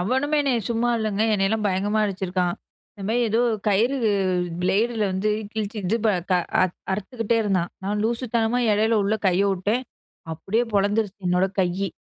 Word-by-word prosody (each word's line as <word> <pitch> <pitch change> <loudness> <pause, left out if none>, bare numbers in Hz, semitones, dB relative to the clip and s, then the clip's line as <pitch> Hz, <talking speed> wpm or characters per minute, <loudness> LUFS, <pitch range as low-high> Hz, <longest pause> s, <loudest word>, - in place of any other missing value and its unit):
அவனுமே 265 +10 +1
என்னைய 255 -5 +1
சும்மா 235 +1 +1
இல்லைங்க. 215 -1 -1
என்னையெல்லாம் 210 +2 0
பயங்கரமா 205 +3 0
அடிச்சிருக்கான். 185 -2 -1 0.4
இந்த 200 - -8
மாதிரி 240 +1 +2
ஏதோ 225 +2 +2 0.3
கயிறு 230 +7 +2 0.7
பிளேடில 220 +4 +1
வந்து 195 +3 0 0.2
கிழிச்சி 220 0 -4
இது 215 +6 +1
ப - - +4 0.2
க - - +4 0.3
அறுத் 185 -1 -1 0.2
அறுத்துக்கிட்டே 230 +3 -1
இருந்தான். 190 -4 0
நான் 210 +1 -1
லூசுத்தனமா 235 0 0
இடையில 220 +1 +2
உள்ள 210 +2 +1
கையை 190 +2 +3
உட்டேன். 210 +7 -1 0.5
அப்படியே 210 +9 -1
பொளந்துருச்சு 205 0 +1
என்னோட 180 +2 +3
கையி. 185 +1 -1
210 Hz, 150 wpm, -23 LUFS, 190-230 Hz, 0.7 s, ப